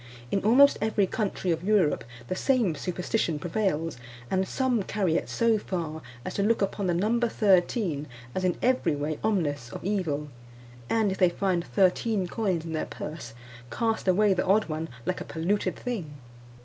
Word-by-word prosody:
In 195 Hz, -, 0 dB
almost 265 Hz, +7 st, +6 dB
every 215 Hz, -2 st, +2 dB
country 190 Hz, -3 st, -2 dB
of 165 Hz, +1 st, -1 dB
Europe 195 Hz, -6 st, +2 dB, 0.2 s
the 185 Hz, -, -2 dB
same 240 Hz, -, +2 dB
superstition 180 Hz, 0 st, -1 dB
prevails, 165 Hz, -3 st, -1 dB, 0.3 s
and 190 Hz, 0 st, +1 dB
some 255 Hz, -2 st, +1 dB
carry 190 Hz, -4 st, 0 dB
it -, -, -1 dB
so 230 Hz, -2 st, +2 dB
far 165 Hz, -5 st, -4 dB, 0.2 s
as -, -, -4 dB
to -, -, -1 dB
look 225 Hz, +3 st, +2 dB
upon 195 Hz, 0 st, -1 dB
the 175 Hz, -, +2 dB
number 230 Hz, +6 st, +1 dB
thirteen 185 Hz, -, +2 dB, 0.3 s
as 185 Hz, -, -2 dB
in 180 Hz, -2 st, +1 dB
every 255 Hz, -, +2 dB
way 145 Hz, +1 st, -3 dB
ominous 150 Hz, -, 0 dB
of -, -, -7 dB
evil; 160 Hz, -8 st, -1 dB, 0.6 s
and 220 Hz, -3 st, +2 dB
if 190 Hz, -, -4 dB
they 180 Hz, -, +5 dB
find 180 Hz, -1 st, 0 dB
thirteen 190 Hz, -, +2 dB
coins 180 Hz, -5 st, -1 dB
in 165 Hz, -, -5 dB
their 155 Hz, -, -1 dB
purse, 150 Hz, -7 st, -7 dB, 0.3 s
cast 225 Hz, -, -1 dB
away 200 Hz, +2 st, +4 dB
the 180 Hz, -, 0 dB
odd 210 Hz, +3 st, +3 dB
one 160 Hz, 0 st, -4 dB, 0.2 s
like 185 Hz, -, -2 dB
a -, -, -2 dB
polluted 185 Hz, +3 st, -1 dB
thing. 220 Hz, -, -4 dB
185 Hz, 175 wpm, -27 LUFS, 165-215 Hz, 0.6 s, almost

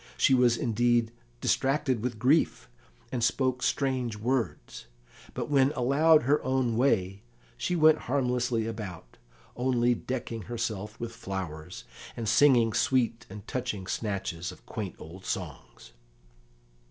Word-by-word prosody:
She 135 Hz, -, +4 dB
was 125 Hz, -2 st, +4 dB
indeed 120 Hz, 0 st, +1 dB, 0.3 s
distracted 135 Hz, -3 st, +1 dB
with 120 Hz, -1 st, -3 dB
grief, 130 Hz, -, +2 dB, 0.4 s
and 125 Hz, -3 st, -2 dB
spoke 130 Hz, +1 st, +1 dB
strange 130 Hz, -5 st, 0 dB
words, 115 Hz, -, -3 dB, 0.5 s
but -, -, -3 dB
when 140 Hz, -1 st, +3 dB
allowed 150 Hz, +4 st, +4 dB
her 145 Hz, +4 st, +2 dB
own 130 Hz, -3 st, 0 dB
way 100 Hz, -6 st, +1 dB, 0.3 s
she 180 Hz, -, -2 dB
went 155 Hz, -1 st, +5 dB
harmlessly 125 Hz, -4 st, 0 dB
about, 100 Hz, -, -7 dB, 0.4 s
only 125 Hz, -1 st, +2 dB
decking 120 Hz, -2 st, -4 dB
herself 110 Hz, -3 st, -4 dB
with 115 Hz, -1 st, -4 dB
flowers, 90 Hz, -, -6 dB, 0.3 s
and 115 Hz, -2 st, -3 dB
singing 120 Hz, -2 st, +5 dB
sweet 115 Hz, -2 st, +1 dB
and 100 Hz, +1 st, -10 dB
touching 120 Hz, -7 st, -3 dB
snatches 95 Hz, -4 st, -3 dB
of 90 Hz, -, -16 dB
quaint 100 Hz, -5 st, -5 dB
old 90 Hz, +4 st, -11 dB
songs. 90 Hz, -, -6 dB
120 Hz, 125 wpm, -28 LUFS, 105-130 Hz, 0.5 s, went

